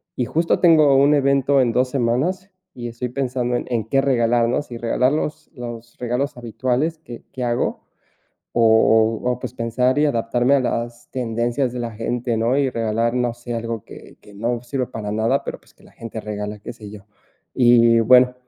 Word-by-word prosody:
y 125 - -1
justo 165 +7 +1
tengo 155 -5 +5
un 140 +2 +5
evento 140 0 +2
en 120 -2 +2
2, 125 +1 +1
semanas 140 +10 -1 0.3
y 120 -1 -6
estoy 120 +1 -5
pensando 125 -2 -2
en - - -2
en 115 -3 0
qué 135 - +3
regalar, 120 -3 +2
¿no? 125 - 0
Si 120 -5 -9
regalar 125 +3 +1
los 150 0 -4
los 120 -2 -8
regalos 125 +2 -2
habituales 130 +7 -1
que 120 -5 -10
que 130 - -4
hago, 120 -1 -1 0.7
o 110 -1 +4
o 125 -1 0
pues, - - -6
pensar 125 +3 0
y 150 - +4
adaptarme 120 0 +1
a 135 - +2
las 120 -1 -4
tendencias 120 +1 -1
de 125 - -5
la 120 -1 -3
gente, 115 +1 -2
¿no?, 115 +4 +1
y 135 -2 +1
regalar, 115 0 0
no 125 -1 0
sé, 120 0 -7
algo 115 -1 -4
que - - -13
que 105 - -16
no 120 +3 -2
sirve 125 0 -3
para 105 -2 -5
nada, 115 +6 +1
pero - - -5
pues, - - -25
que - - -23
la - - -19
gente 115 -1 -7
regala, 105 0 -5
qué - - -7
sé 105 -4 -11
yo. 100 -2 -12 0.5
Y 120 -2 +5
bueno, 125 +2 +5
120 Hz, 195 wpm, -21 LUFS, 115-130 Hz, 0.7 s, tengo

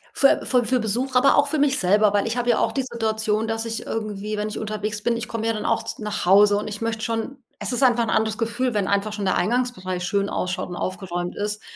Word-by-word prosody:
Für 275 - +4
fü 250 -2 +2
für 255 +2 +1
Besuch, 245 +5 -2
aber 270 +2 +5
auch 285 - +4
für 300 +2 -1
mich 285 -1 +3
selber, 205 +3 +3
weil 205 -1 +1
ich 225 +1 -2
habe 245 0 +1
ja 235 - +3
auch - - +1
die 270 - 0
Situation, 220 -2 -1
dass 225 0 -1
ich 225 0 -4
irgendwie, 215 -1 -4
wenn 210 +1 -2
ich 215 - -5
unterwegs 210 -1 -3
bin 235 0 +1
ich 235 +1 -4
komme 225 -1 -4
ja 225 - +1
dann 210 - -4
auch 225 - 0
z - - -6
nach 210 -4 -3
Hause, 205 +2 +6
und 210 - -4
ich 210 +1 -6
möchte 225 -1 -2
schon 230 +4 -3 0.2
Es - - -3
ist 245 - -1
einfach 240 -2 +4
'n 225 - -2
anderes 220 -1 +1
Gefühl, 235 +2 -1
wenn 205 -2 0
einfach 200 +1 0
schon 210 -1 -4
der 190 - +1
Eingangsbereich 210 -7 -1
schön 200 +2 0
ausschaut 185 -1 -2
und 175 - -6
aufgeräumt 175 -2 -4
ist. 210 +1 -3
220 Hz, 260 wpm, -23 LUFS, 205-235 Hz, 0.2 s, Hause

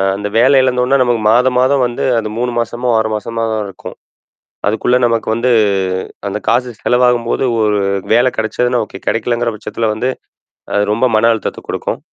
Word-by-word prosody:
அந்த 105 +1 -4
வேல 135 +3 +5
இழந்தோன்னே 125 +1 +2
நமக்கு 120 -2 0
மாதம் 125 +2 +3
மாதம் 130 +1 +2
வந்து 120 - -5 0.2
அது 110 - -4
3 125 0 -1
மாசமோ 120 +2 -2
6 110 0 0
மாசமா 115 +2 -4
தான் 110 -1 -1
இருக்கும் 95 - -10 0.7
அதுக்குள்ளே 115 +4 +2
நமக்கு 115 -1 -1
வந்து 120 +2 0 0.8
அந்த 100 +1 -3
காசு 125 +1 +2
செலவாகும்போது 125 0 +1 0.2
1 105 -1 +1 0.3
வேல 120 +2 +4
கிடைச்சதுன்னா 120 +2 0
ஓகே, - - -10
கெடைக்கலங்கிற 120 0 0
பட்சத்தில 110 +1 -3
வந்து 125 +4 -2 0.7
அது 105 0 +2
ரொம்ப 115 +4 +2
மன 115 +2 +4
அழுத்தத்த 110 - -4
குடுக்கும். - - -3
120 Hz, 160 wpm, -15 LUFS, 110-125 Hz, 0.8 s, வேல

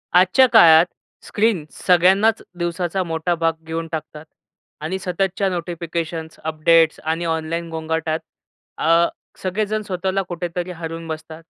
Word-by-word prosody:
आजच्या 185 +9 +6
काळात 170 -8 +8 0.4
स्क्रीन 205 -7 +1
सगळ्यांनाच 190 +5 +3 0.2
दिवसाचा 175 +2 -1
मोठा 165 +1 -1
भाग 165 0 +1
घेऊन 165 0 -3
टाकतात 155 -1 -6 0.6
आणि 175 +5 -3
सततच्या 190 +2 -1
नोटिफिकेशन्स, 170 -2 -4
अपडेट्स 160 +1 +3
आणि 160 +2 -1
ऑनलाईन 165 +1 -2
गोंगाटात 160 0 -2 0.6
अ, 165 +2 +4 0.3
सगळेजण 210 +3 -1
स्वतःला 190 -1 -2
कुठेतरी 175 0 -4
हरवून 165 -1 -6
बसतात. 160 +1 -7
170 Hz, 115 wpm, -21 LUFS, 160-185 Hz, 0.6 s, काळात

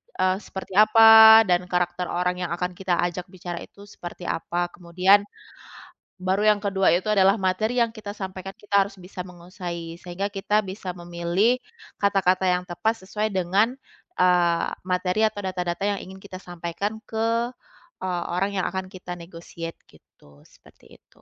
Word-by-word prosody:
eee, 185 0 +1
seperti 190 0 -8
apa 220 +1 +9
dan 175 0 +3
karakter 180 0 0
orang 180 +1 -1
yang 170 - -6
akan 180 +1 -3
kita 185 -2 0
ajak 175 0 -4
bicara 175 -2 -7
itu 200 - -15
seperti 175 -2 -9
apa. 175 +1 -2
Kemudian 185 +3 +3 1.0
baru 190 +3 0
yang 210 -1 +4
kedua 195 -1 +2
itu 185 +4 -2
adalah 195 -1 +5
materi 205 +6 0
yang 230 - -2
kita 215 -2 -8
sampaikan, 190 -1 -7
kita 200 -1 +1
harus 200 - -14
bisa 180 +1 -12
menguasai 175 -2 -8
sehingga 185 +3 -4
kita 210 +2 0
bisa 190 -1 -6
memilih 175 +7 0 0.4
kata-kata 190 -2 +2
yang 180 0 +1
tepat 220 +4 -2
sesuai 215 +1 -1
dengan, 195 +7 +2 0.4
eee, 175 -2 +3 0.2
materi 180 +3 0
atau 205 -1 -5
data-data 180 0 -3
yang - - -6
ingin 190 +1 -11
kita 185 -2 -9
sampaikan 175 +4 -5
ke, 225 +1 -1 0.7
eee, 180 -2 -2
orang 195 +3 0
yang - - -1
akan 190 0 -4
kita 180 -2 -8
negotiate 170 -1 -9
gitu, 70 0 -22
seperti - - -21
itu. - - -29
185 Hz, 155 wpm, -24 LUFS, 175-200 Hz, 1.0 s, apa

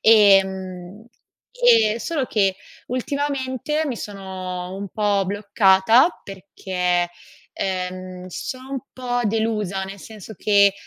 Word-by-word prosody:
Ehm, 195 -2 +3 0.5
e 465 - +4
solo 305 -1 -1
che, 195 -5 +1 0.3
ultimamente 280 +3 -2
mi 260 -5 -3
sono 185 -3 -6
un 200 +1 -6
po' 205 -1 +1
bloccata, 205 - +4 0.2
perché, 180 -2 -2 0.4
ehm, 185 -1 -4
sono 255 +8 -6
un 270 - -3
po' 245 -1 -2
delusa, 210 -3 -1
nel 195 +1 -9
senso 220 0 -10
che, 200 0 +4
200 Hz, 105 wpm, -22 LUFS, 190-235 Hz, 0.5 s, e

